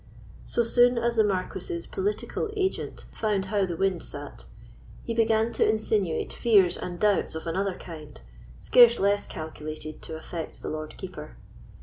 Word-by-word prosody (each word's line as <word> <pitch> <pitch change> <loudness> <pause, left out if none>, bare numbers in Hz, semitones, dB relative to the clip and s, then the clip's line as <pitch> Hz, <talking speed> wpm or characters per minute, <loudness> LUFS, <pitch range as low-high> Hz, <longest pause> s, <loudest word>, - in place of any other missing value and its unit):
So 235 - +1
soon 245 +1 +4
as 235 0 +1
the 220 - +5
Marquis's 210 - -2
political 415 +2 -2
agent 380 -1 -2
found 210 -3 0
how 200 -2 +2
the 170 -2 -4
wind 190 -2 +1
sate, 145 - -8 0.6
he 230 - -3
began 225 0 +2
to - - +3
insinuate 215 -5 0
fears 200 -7 +4
and 175 -1 -6
doubts 205 -6 +2
of 160 - -5
another 185 +3 -1
kind, 155 - -10 0.4
scarce 240 -1 +6
less 200 +1 +2
calculated 155 -1 -7
to 160 - -7
affect 160 0 -7
the - - -3
Lord 155 0 -6
Keeper. - - -8
200 Hz, 150 wpm, -27 LUFS, 165-230 Hz, 0.6 s, scarce